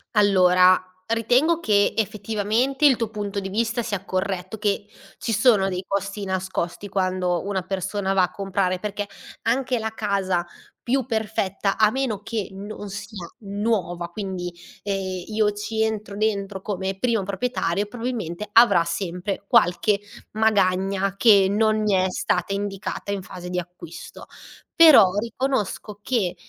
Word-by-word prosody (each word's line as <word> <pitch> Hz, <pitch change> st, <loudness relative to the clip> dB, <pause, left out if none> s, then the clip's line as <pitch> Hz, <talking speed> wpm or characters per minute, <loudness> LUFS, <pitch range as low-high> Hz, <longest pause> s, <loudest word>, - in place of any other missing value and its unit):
Allora, 185 Hz, -3 st, +5 dB, 0.3 s
ritengo 245 Hz, +9 st, +2 dB
che 205 Hz, -10 st, +2 dB
effettivamente 220 Hz, +6 st, 0 dB
il 275 Hz, -3 st, +7 dB
tuo 230 Hz, -2 st, -2 dB
punto 205 Hz, -2 st, -4 dB
di 195 Hz, -1 st, -5 dB
vista 230 Hz, +4 st, -1 dB
sia 200 Hz, -4 st, -3 dB
corretto. 185 Hz, +1 st, -3 dB
Che 205 Hz, -1 st, -1 dB, 0.3 s
ci 230 Hz, -, -3 dB
sono 210 Hz, -3 st, +4 dB
dei 180 Hz, 0 st, -3 dB
costi 200 Hz, +1 st, -3 dB
nascosti 190 Hz, 0 st, -3 dB
quando 185 Hz, -2 st, 0 dB
una 195 Hz, -1 st, -1 dB
persona 195 Hz, +1 st, -2 dB
va 190 Hz, -1 st, +4 dB
a 180 Hz, -, 0 dB
comprare. 195 Hz, -2 st, -1 dB
Perché 205 Hz, 0 st, -4 dB, 0.4 s
anche 250 Hz, +2 st, +1 dB
la 220 Hz, -1 st, -3 dB
casa 195 Hz, -5 st, -1 dB, 0.4 s
più 260 Hz, +1 st, 0 dB
perfetta, 210 Hz, -4 st, -1 dB
a 215 Hz, -1 st, +4 dB
meno 255 Hz, -6 st, -2 dB
che 215 Hz, -3 st, -3 dB
non 205 Hz, +1 st, -7 dB
sia 200 Hz, -2 st, -7 dB
nuova, 200 Hz, -5 st, -2 dB
quindi, 190 Hz, -4 st, -5 dB, 0.3 s
ehm, 190 Hz, -2 st, -3 dB
io 215 Hz, -1 st, +1 dB
ci 220 Hz, +2 st, -2 dB
entro 215 Hz, -2 st, -3 dB
dentro 200 Hz, -2 st, -1 dB
come 190 Hz, -1 st, -3 dB
primo 230 Hz, 0 st, +1 dB
proprietario, 200 Hz, -2 st, -1 dB
probabilmente 215 Hz, -5 st, -4 dB
avrà 230 Hz, -7 st, +6 dB
sempre 185 Hz, +2 st, -3 dB
qualche 205 Hz, -2 st, +3 dB, 0.3 s
magagna 195 Hz, -2 st, +1 dB
che 200 Hz, -4 st, +6 dB
non 215 Hz, +1 st, +2 dB
mi 210 Hz, -1 st, +1 dB
è 185 Hz, -1 st, +3 dB
stata 180 Hz, +1 st, -1 dB
indicata 200 Hz, 0 st, -4 dB
in 200 Hz, -1 st, -2 dB
fase 180 Hz, -1 st, -9 dB
di 180 Hz, 0 st, -1 dB
acquisto. 175 Hz, -2 st, -10 dB, 0.5 s
Però 310 Hz, -, +9 dB
riconosco 225 Hz, -3 st, -3 dB
che, 210 Hz, -8 st, 0 dB
200 Hz, 140 wpm, -23 LUFS, 190-220 Hz, 0.5 s, Però